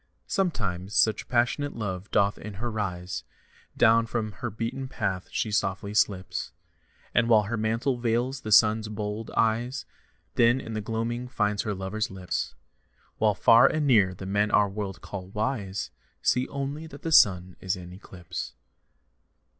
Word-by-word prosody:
Sometimes 105 - -2
such 110 -1 +3
passionate 125 +4 +1
love 100 -3 -4
doth 100 0 +2
in 105 -1 -8
her 120 +4 -3
rise, 90 -4 -3 0.5
Down 115 +1 +5
from 110 -1 -2
her 90 - -5
beaten 120 +5 -4
path 95 -7 -3
she 110 - -1
softly 100 0 -1
slips, 95 -3 0 0.6
And 120 0 +3
with 110 -2 +5
her 115 +4 -2
mantle 115 +4 0
veils 120 +3 0
the 110 - -5
Sun's 110 +1 +5
bold 105 +1 -4
eyes, 120 +4 +1 0.5
Then 120 +2 +4
in 115 -4 -7
the 110 - -2
gloaming 115 +3 -3
finds 105 -4 0
her 105 -2 -3
lover's 95 +3 -3
lips. 95 -2 -4 0.6
While 105 -2 +3
far 115 +5 +7
and 155 +1 0
near 100 -9 +4
the 95 - -8
men 100 +2 +1
our 105 -1 +4
world 100 -1 -5
call 95 -2 -7
wise 105 -1 -3 0.3
See 125 +1 +2
only 140 +3 -4
that 145 -2 -12
the 165 - -2
Sun 90 - +5
is 95 -1 -1
in 90 -1 -10
eclipse. 90 -2 -7
110 Hz, 155 wpm, -27 LUFS, 95-120 Hz, 0.6 s, far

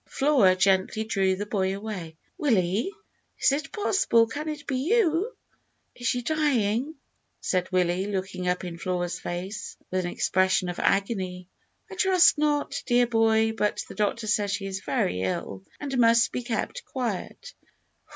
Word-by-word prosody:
Flora 270 -10 +3
gently 190 +3 +2
drew 195 -3 +1
the 205 +2 -4
boy 195 -2 -1
away. 190 -7 -6 0.2
"Willie, 225 - +1 0.5
is - - +4
it 300 +3 -2
possible; 380 - +3
can 295 +7 -5
it 300 -1 -6
be 265 - -1
you?" 365 - +1 0.6
"Is 245 - -5
she 245 +1 0
dyin'?" 275 -2 0 0.4
said 185 0 -1
Willie, 180 +1 +1
looking 190 -2 -3
up 180 +1 0
in 170 -2 -6
Flora's 180 -1 -2
face 185 +4 -5
with 185 0 0
an 175 - -2
expression 185 0 +1
of 175 - -5
agony. 190 -3 0 0.4
"I - - -6
trust 370 -4 +4
not, 295 -1 0
dear 245 -1 +4
boy; 225 -1 +3
but 210 -2 -1
the - - -9
doctor 215 +2 -1
says 210 -1 +1
she 195 - -2
is 190 -1 -4
very 90 - -1
ill, 95 +1 -3 0.2
and 280 -2 -4
must 230 0 +5
be - - -3
kept 235 -3 -3
quiet." 255 - -5
215 Hz, 155 wpm, -26 LUFS, 185-265 Hz, 0.6 s, must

